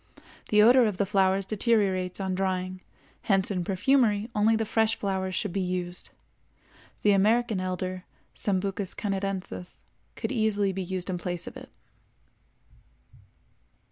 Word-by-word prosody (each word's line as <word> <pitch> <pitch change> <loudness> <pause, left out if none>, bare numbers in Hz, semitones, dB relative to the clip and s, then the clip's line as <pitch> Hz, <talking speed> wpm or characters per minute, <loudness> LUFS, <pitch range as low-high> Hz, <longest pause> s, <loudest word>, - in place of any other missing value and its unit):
The 210 0 +6
odor 245 +1 +6
of 205 -4 -3
the 200 - +1
flowers 195 -1 +2
deteriorates 195 -4 +1
on 190 -1 -2
drying, 185 0 -2 0.5
hence 195 0 +3
in 180 -3 -1
perfumery 210 +3 +2
only 215 +1 +3
the 220 0 0
fresh 220 +1 +2
flowers 190 -2 -2
should 205 -5 -2
be 195 - 0
used. 180 -1 -2 0.9
The 210 - +5
American 215 +2 +3
elder 185 0 -3 0.3
(Sambucus 195 -1 -2
canadensis) 195 -3 -4 0.3
could - - -4
easily 210 -5 +1
be 190 - -3
used 185 0 -3
in 180 - -3
place 175 0 -4
of - - -9
it. - - -10
195 Hz, 135 wpm, -27 LUFS, 185-210 Hz, 0.9 s, The